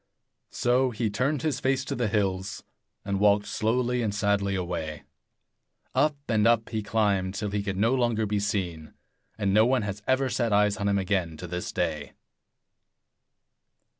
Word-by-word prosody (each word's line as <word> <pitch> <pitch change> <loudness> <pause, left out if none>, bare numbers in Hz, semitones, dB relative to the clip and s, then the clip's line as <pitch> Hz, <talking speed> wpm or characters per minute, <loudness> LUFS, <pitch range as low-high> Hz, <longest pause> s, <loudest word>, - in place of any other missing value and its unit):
So 125 +2 +2
he 110 -2 -2
turned 135 +7 0
his 150 -5 0
face 130 0 0
to - - -3
the 120 -1 0
hills, 100 -2 -1 0.4
and 100 -1 -1
walked 105 0 +4
slowly 125 +2 0
and 105 -3 -1
sadly 100 -1 +1
away. 85 -5 -4 0.9
Up 150 -1 +2
and 110 -1 +3
up 115 -1 +2
he 110 -2 -2
climbed, 100 -3 0
till 105 -1 -3
he 105 0 -1
could 100 -2 -3
no 115 +5 +3
longer 120 -4 +1
be 105 0 0
seen; 90 -6 -3 0.4
and 100 -3 0
no 110 +3 +5
one 130 -3 +2
has 100 0 -4
ever 130 +1 +2
set 120 -3 0
eyes 105 0 +3
on 100 -2 -1
him 100 0 +2
again 95 -5 -1
to 90 - -7
this 90 +1 -4
day. 75 -5 -2
105 Hz, 165 wpm, -27 LUFS, 100-120 Hz, 0.9 s, no